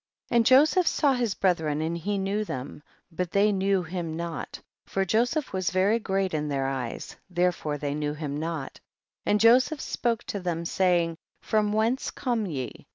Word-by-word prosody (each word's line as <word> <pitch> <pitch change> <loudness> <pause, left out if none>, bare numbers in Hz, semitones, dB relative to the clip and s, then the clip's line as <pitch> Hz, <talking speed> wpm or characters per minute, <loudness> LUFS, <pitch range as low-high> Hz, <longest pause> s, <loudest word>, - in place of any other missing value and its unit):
20. - - -1
And 230 - +4
Joseph 305 +7 +5
saw 285 -3 +3
his 240 -5 0
brethren, 160 -6 +1
and 160 +2 -1
he 200 +5 -2
knew 195 +2 -1
them, 135 -6 -6 0.3
but 180 +1 -2
they 200 +3 +3
knew 195 -1 +1
him 170 -2 -4
not, 170 -1 -5 0.2
for 195 0 -1
Joseph 245 - 0
was 185 -2 0
very 195 +5 +2
great 195 -3 -1
in 150 -1 -1
their 135 -1 -1
eyes, 130 -3 -4
therefore 175 -4 0
they 145 -1 -3
knew 150 0 -2
him 150 -2 -4
not. 160 -3 -4 0.5
21. - - -2
And 210 - +3
Joseph 250 +7 +5
spoke 235 -3 -1
to 200 - -4
them, 170 -2 -3
saying, 170 -2 +1 0.3
from 215 -1 +1
whence 225 +5 +1
come 235 -5 -2
ye 135 -7 -6
185 Hz, 180 wpm, -27 LUFS, 160-215 Hz, 0.5 s, Joseph